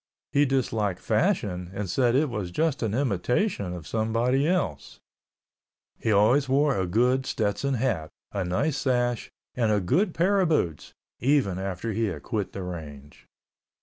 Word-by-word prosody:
He 145 +1 +4
disliked 110 -8 0
fashion 105 - 0
and 105 0 -3
said 120 +5 +2
it 150 +3 +3
was 105 -6 -3
just 150 - 0
an 110 -2 -1
imitation 125 - 0
of 90 -3 -7
someone 115 +6 0
else. 145 - -1 1.0
He 110 - 0
always 120 +7 +4
wore 140 +1 +3
a 95 -1 0
good 125 +7 +2
Stetson 115 +6 0
hat, 110 -11 -1 0.2
a 100 - -2
nice 130 - 0
sash, 120 -3 0 0.2
and 115 -3 +1
a 105 - +3
good 160 - +1
pair 195 +4 +3
of 180 - +2
boots—even 120 - -1
after 95 +3 -3
he 115 +2 0
had 100 - -4
quit 105 -5 -3
the 95 - -5
range. 75 -5 -9
115 Hz, 150 wpm, -26 LUFS, 95-135 Hz, 1.0 s, He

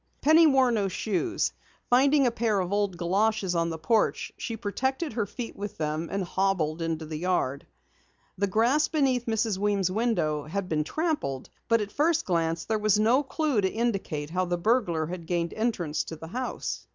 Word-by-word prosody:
Penny 315 +2 +6
wore 265 -3 +4
no 210 -4 +1
shoes. 215 - -1 0.3
Finding 275 +3 +4
a 245 - +3
pair 225 -3 0
of 185 +1 -2
old 205 -3 0
galoshes 195 +2 +1
on 170 -1 +1
the 165 - -4
porch, 215 +8 +1
she 230 - -5
protected 265 +8 -2
her 215 -3 -1
feet 235 +3 -6
with 205 +1 -6
them, 155 +1 -2
and 195 -1 -1
hobbled 175 -4 0
into 165 -1 -2
the 155 0 -5
yard. 165 -6 -1 0.7
The 200 +2 0
grass 235 +10 +3
beneath 265 -6 +1
Mrs. 220 -3 0
Weems' 200 -3 +1
window 175 -9 0
had 185 +4 -3
been 155 -3 0
trampled, 295 - -2 0.2
but 230 -1 +3
at 205 0 -4
first 325 +5 +1
glance 165 -2 0
there 220 -1 0
was 210 -1 +3
no 230 +6 +4
clue 290 -4 0
to 190 - +1
indicate 195 -10 -2
how 185 +1 0
the 175 0 -1
burglar 175 -5 +1
had 170 0 -7
gained 170 -1 -1
entrance 195 -9 -1
to 160 - -7
the 160 +1 -10
house. 255 +6 -4
200 Hz, 185 wpm, -27 LUFS, 170-240 Hz, 0.7 s, Penny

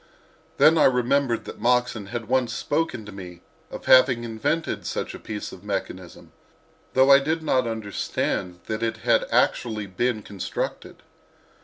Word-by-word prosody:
Then 160 +1 +6
I - - +6
remembered 125 0 +1
that - - -9
Moxon 120 -3 +1
had 115 +1 -5
once 130 -1 +1
spoken 145 -7 -2
to 105 - -9
me 90 -3 -10 0.3
of - - -9
having 130 -2 +5
invented 120 +8 -2
such - - -3
a - - -9
piece 105 -1 -6
of 90 - -12
mechanism, 95 -3 -6 0.6
though 130 +1 +5
I 140 - +9
did 160 +3 -2
not 130 -5 +1
understand 100 -4 -3
that 110 0 -4
it 115 -1 -1
had - - +3
actually 110 -3 +1
been 110 +3 -2
constructed. 100 -3 -5
115 Hz, 150 wpm, -24 LUFS, 105-130 Hz, 0.6 s, I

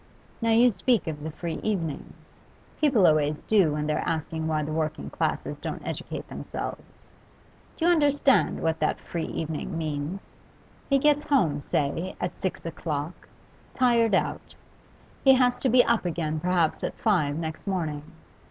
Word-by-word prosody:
Now, 230 - +1
you 235 +2 +6
speak 230 +3 +1
of 155 -2 -5
the 155 - -4
free 165 +1 -5
evenings; 170 -9 -3 0.6
people 265 -11 +4
always 150 -1 +3
do, 195 -8 +3
when 150 0 -2
they're 150 - 0
asking 160 0 -2
why 155 -1 0
the 150 - -4
working 155 0 -2
classes - - -2
don't - - -5
educate - - -5
themselves. - - -7 0.7
Do 330 - 0
you 350 - +6
understand 285 -4 +3
what 160 0 0
that - - 0
free 170 -2 -4
evening 160 +1 -4
means? 155 +3 -4 0.6
He 275 - +5
gets 295 +1 +3
home, 165 - +2
say, 155 +6 -1
at 175 - -2
six 185 - -3
o'clock, 160 -1 -5 0.5
tired 235 -5 +3
out; - - -2 0.7
he 270 - +8
has 250 -1 +3
to 265 - 0
be 245 +1 +6
up 235 -1 +2
again 160 -3 -2
perhaps 175 -1 +1
at - - -2
five 170 -10 +1
next 160 +3 -5
morning. 160 -6 -2
170 Hz, 155 wpm, -26 LUFS, 155-230 Hz, 0.7 s, he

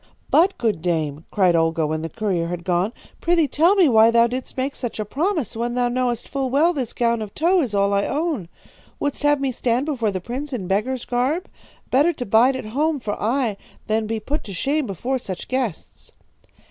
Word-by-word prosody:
"'But, 370 +5 +4
good 215 -9 0
dame,' 160 -3 -1
cried 185 -4 +3
Olga 165 -1 +2
when 155 +1 -2
the 165 - -4
courier 190 -6 -1
had 175 0 -5
gone, 180 +3 +1 0.3
'prithee 335 -3 +3
tell 335 +8 +3
me 375 -5 +5
why 225 -3 +6
thou 230 0 +5
didst 250 +3 -5
make 270 +2 -1
such 240 -3 -5
a 215 - -1
promise, 315 - -1
when 240 +1 -2
thou 245 -1 +1
knowest 245 -1 -1
full 270 -2 -2
well 305 +7 +3
this 260 -7 -3
gown 235 -1 0
of 210 -2 -7
tow 350 +3 +3
is 235 -8 -2
all 200 0 +2
I 200 0 +2
own? 290 - -2 0.5
Wouldst 285 -1 -2
have 290 -1 +3
me 275 -1 0
stand 245 +2 0
before 255 -8 0
the 190 -2 -2
prince 260 +9 -5
in 215 -7 -3
beggar's 215 +7 -1
garb? 265 +9 0 0.4
Better 295 +7 +4
to 245 - -5
bide 235 +6 +4
at 260 - -5
home 290 +7 0
for 210 -4 -3
aye 230 -2 0 0.3
than 220 0 0
be 225 0 -2
put 285 +8 -3
to 200 -4 -7
shame 280 - 0
before 245 +8 -2
such 185 -6 -6
guests.' 255 -9 -4
240 Hz, 210 wpm, -22 LUFS, 200-280 Hz, 0.5 s, why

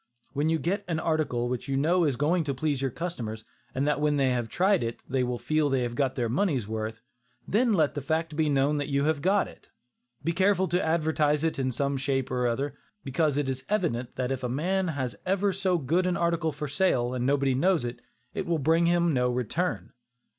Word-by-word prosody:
When 145 +2 +1
you 165 - +2
get 190 +6 -1
an 165 -3 -1
article 155 -7 0
which 125 +1 -3
you 135 -1 0
know 170 +5 +3
is 140 -4 +1
going 160 +7 +1
to 140 -2 -2
please 145 0 -1
your 135 - 0
customers, 115 -8 -5 0.3
and 135 +3 0
that 150 0 +1
when 150 -1 +2
they 135 -2 +3
have 120 -2 -1
tried 190 +1 +2
it, 115 0 -3
they 130 -1 0
will 125 0 -1
feel 155 +2 +1
they 135 -2 +1
have 120 -1 -3
got 130 +1 0
their 120 -3 0
money's 130 - 0
worth, 110 0 -4 0.4
then 235 +3 +2
let 155 -6 +2
the 145 - -4
fact 160 +2 -1
be 155 -1 +1
known 140 +1 +2
that 145 - -2
you 140 -1 +1
have 155 -1 +1
got 195 +4 +2
it. - - -16 0.5
Be 165 - +1
careful 190 +2 +2
to 180 +2 +1
advertise 155 -2 +1
it 160 -3 0
in 130 -1 0
some 140 +2 -1
shape 135 -1 -1
or 125 -1 +1
other, 135 +5 -1 0.3
because 145 +1 0
it 145 -2 0
is 130 -1 -3
evident 145 - -1
that 130 0 -2
if 135 -1 -3
a 125 - -1
man 180 +8 0
has 130 -6 -3
ever 195 +1 +1
so 185 -1 +1
good 170 +5 +1
an 180 - 0
article 170 -1 +1
for 150 +1 -5
sale, 130 -6 +1
and 125 -1 -2
nobody 140 -1 +2
knows 165 +1 +2
it, 120 - -5 0.3
it - - -3
will 170 -1 +1
bring 165 +4 +3
him 170 -1 +3
no 125 -1 +2
return. 125 - -2
145 Hz, 225 wpm, -27 LUFS, 130-170 Hz, 0.5 s, know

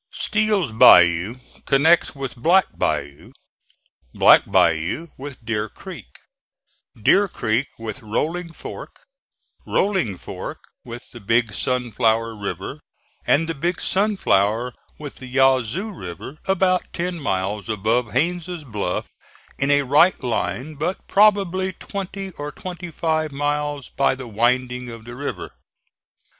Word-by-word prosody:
Steel's 210 - +1
Bayou 90 -1 +6 0.3
connects 160 +4 +4
with 135 -2 -5
Black 170 +10 +4
Bayou, 70 0 -3 0.8
Black - - +6
Bayou 90 - +2
with 135 -3 -10
Deer 110 -1 -2
Creek, - - -10 0.9
Deer 200 - +4
Creek 120 - -1
with 110 -2 -6
Rolling 165 +11 -2
Fork, 165 - -10 0.6
Rolling 185 - 0
Fork - - -7 0.3
with 120 0 -10
the 120 - -10
Big 115 +1 +1
Sunflower 115 -2 0
River, 100 -1 -5 0.5
and 160 +3 +3
the 165 - -2
Big 170 +4 -2
Sunflower 125 - +1 0.2
with 145 -2 -9
the 130 - -9
Yazoo 135 - +2
River 95 - -8
about 185 -1 +1
ten 175 0 -3
miles 100 -4 -2
above 110 +2 0
Haines' 175 +4 -1
Bluff 105 -8 -3 0.5
in 140 - +1
a 145 0 +4
right 145 +6 +4
line 125 +4 -2
but 155 +6 -3
probably 195 -2 +3
twenty 195 +1 -6
or 145 0 -4
twenty 175 +3 -7
five 160 -1 -1
miles 145 -1 -2
by 135 -1 +1
the 130 -2 -8
winding 125 +2 0
of 115 -1 -10
the 120 0 -9
river. 140 +3 -5
135 Hz, 125 wpm, -22 LUFS, 115-170 Hz, 0.9 s, Bayou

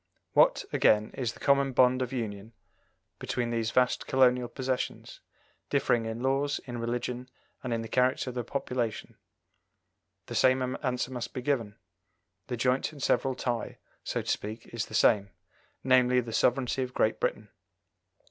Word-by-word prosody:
What, - - +4
again, 105 0 +3
is 120 -3 -2
the - - -16
common 140 -1 +2
bond 125 +1 +4
of 125 - -2
union 110 -3 -5 0.7
between 120 -1 -2
these 115 -1 0
vast 125 +2 +1
colonial 125 -2 +3
possessions, 130 +1 -4 0.5
differing 115 -2 +1
in 115 +2 -5
laws, 140 +2 +1
in 120 -2 -6
religion, 120 +2 -3 0.3
and 130 - -4
in 115 -1 -1
the - - -6
character 125 +1 +1
of - - -12
the 120 -1 -3
population? 120 -3 -3 1.1
The - - -8
same 130 0 +2
answer 125 -1 -1
must 125 -2 -5
be 125 - -4
given: 115 -7 -1 0.7
the 125 - -3
joint 125 +5 +1
and 145 -3 -9
several 135 -1 +1
tie, 120 -3 -3 0.3
so - - -2
to - - -14
speak, 110 +3 -3
is 115 -2 -2
the - - -7
same 100 -2 +4 0.5
namely, 125 -1 +4
the 115 -2 -4
sovereignty 125 +2 +1
of 125 -1 -4
Great - - +1
Britain. - - -2
125 Hz, 155 wpm, -29 LUFS, 115-130 Hz, 1.1 s, What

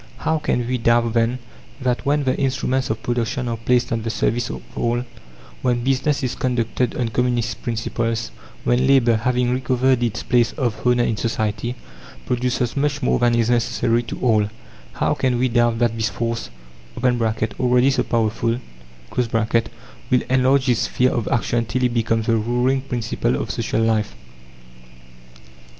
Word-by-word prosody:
How 160 0 0
can 120 -5 -1
we 125 0 -1
doubt, 115 0 +2
then, 115 +1 +1 0.4
that 125 -2 -1
when 145 +1 +2
the 130 -1 +1
instruments 130 -1 0
of 110 0 -3
production 120 +1 -1
are 115 - -1
placed 120 +2 +1
at 115 -1 -1
the 115 - -2
service 120 +1 0
of - - -6
all, 120 +1 0 0.6
when 120 -1 0
business 135 +2 +1
is 125 - -1
conducted 125 0 -1
on 120 -2 -1
Communist 120 -1 -1
principles, 115 0 -2 0.3
when 125 +2 +2
labour, 125 -4 +4
having 125 +2 +1
recovered 130 0 +1
its 115 -1 -1
place 120 -2 +2
of 125 -4 -2
honour 125 0 +4
in 115 -2 0
society, 110 +1 -2 0.5
produces 125 -1 -1
much 145 +1 0
more - - +2
than 120 0 +3
is 115 0 +2
necessary 120 0 +1
to 120 - -7
all 110 -4 +3 0.5
how - - +1
can 125 -2 0
we 130 +2 +2
doubt 120 -1 +2
that 120 -1 +1
this 110 -1 0
force 115 +1 -3 0.6
(already 120 +2 +2
so 130 -2 +1
powerful), 115 +1 0 0.6
will 115 +2 -1
enlarge 130 +1 +3
its 120 -3 +3
sphere 130 0 +1
of 120 - -2
action 115 +1 +1
till 125 +5 -2
it 125 -1 +2
becomes 115 -1 0
the 115 - +2
ruling 125 +4 +1
principle 120 -2 -1
of - - -3
social 115 -1 -1
life? 110 -2 0
120 Hz, 160 wpm, -21 LUFS, 115-125 Hz, 0.6 s, labour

